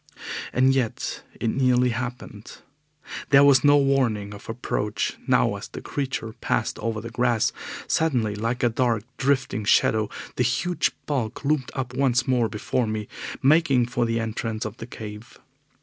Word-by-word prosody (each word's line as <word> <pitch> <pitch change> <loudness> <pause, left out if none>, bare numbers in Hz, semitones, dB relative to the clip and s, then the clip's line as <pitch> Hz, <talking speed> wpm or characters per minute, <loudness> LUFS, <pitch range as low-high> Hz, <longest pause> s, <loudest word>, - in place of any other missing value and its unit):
And 130 +1 +4
yet 125 -4 -2 0.2
it 115 - 0
nearly 125 -1 +3
happened. 120 -3 -6 0.7
There 140 0 +7
was 140 -3 +6
no 145 0 +6
warning 125 -8 +1
of 100 +1 -12
approach 110 -2 -2
now - - +3
as - - -8
the - - -8
creature 130 -5 -4
passed - - -1
over 115 0 -2
the 115 - -7
grass. 120 -1 +2 0.3
Suddenly, 125 -10 +1
like 115 +4 -2
a 120 - +4
dark, 115 -2 0
drifting 130 -5 0
shadow, 110 0 +3 0.3
the 125 - +3
huge 170 +8 +1 0.2
bulk 135 -3 -2
loomed 145 -3 +1
up 130 -2 -3
once 130 -2 +2
more 125 -4 +2
before 115 +3 -1
me, 110 -1 -3 0.4
making 140 -3 +4
for 120 0 0
the 115 0 0
entrance 110 -1 -3
of 110 +2 -6
the 115 - -8
cave. 105 -1 -9
120 Hz, 155 wpm, -24 LUFS, 110-130 Hz, 0.7 s, There